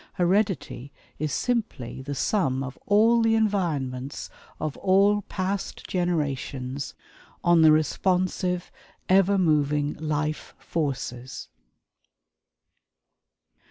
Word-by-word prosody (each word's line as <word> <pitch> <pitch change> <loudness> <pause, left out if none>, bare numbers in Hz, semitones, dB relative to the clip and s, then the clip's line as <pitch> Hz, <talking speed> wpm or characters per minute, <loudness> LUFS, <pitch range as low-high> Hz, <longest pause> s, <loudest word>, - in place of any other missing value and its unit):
Heredity 185 - 0 0.3
is 155 0 -1
simply 220 - -2
the 140 +1 -5
sum 135 -5 0
of 130 0 -6
all 225 +3 +5
the 225 0 +3
environments 150 - -1 0.3
of 155 -2 -3
all 200 +2 +3
past 195 0 -4
generations 140 -6 -2 0.5
on 175 -1 +5
the 160 -1 +7
responsive 180 +3 0 0.4
ever 195 +1 +4
moving 150 -4 +2
life 155 0 -3
forces." 135 -5 -4
160 Hz, 90 wpm, -26 LUFS, 140-195 Hz, 0.5 s, the